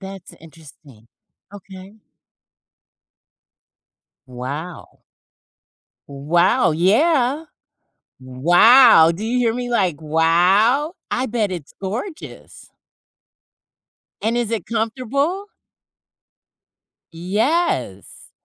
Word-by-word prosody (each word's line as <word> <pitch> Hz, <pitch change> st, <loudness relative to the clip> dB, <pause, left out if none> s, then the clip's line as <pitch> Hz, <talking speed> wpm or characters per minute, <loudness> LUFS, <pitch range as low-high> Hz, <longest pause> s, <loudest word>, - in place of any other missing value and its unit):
That's 195 Hz, -2 st, -11 dB
interesting, 145 Hz, -7 st, -18 dB, 0.4 s
okay. 195 Hz, +1 st, -13 dB, 2.3 s
Wow. 140 Hz, +7 st, -8 dB, 1.1 s
Wow, 170 Hz, -, +1 dB
yeah! 255 Hz, -, +1 dB, 0.7 s
Wow! 165 Hz, -, +5 dB
Do 190 Hz, -, -8 dB
you 245 Hz, -, -2 dB
hear 235 Hz, -2 st, +1 dB
me? 245 Hz, +1 st, -5 dB
Like, 185 Hz, -10 st, -1 dB
wow, 180 Hz, -, +2 dB, 0.2 s
I 255 Hz, +2 st, -2 dB
bet 220 Hz, -5 st, -2 dB
it's 165 Hz, -6 st, -9 dB
gorgeous. 245 Hz, -, -8 dB, 1.5 s
And 225 Hz, +2 st, -2 dB
is 240 Hz, -2 st, -2 dB
it 225 Hz, -6 st, -4 dB
comfortable? 265 Hz, -, -3 dB, 1.6 s
Yes. 220 Hz, -, -3 dB
200 Hz, 70 wpm, -19 LUFS, 165-245 Hz, 2.3 s, Wow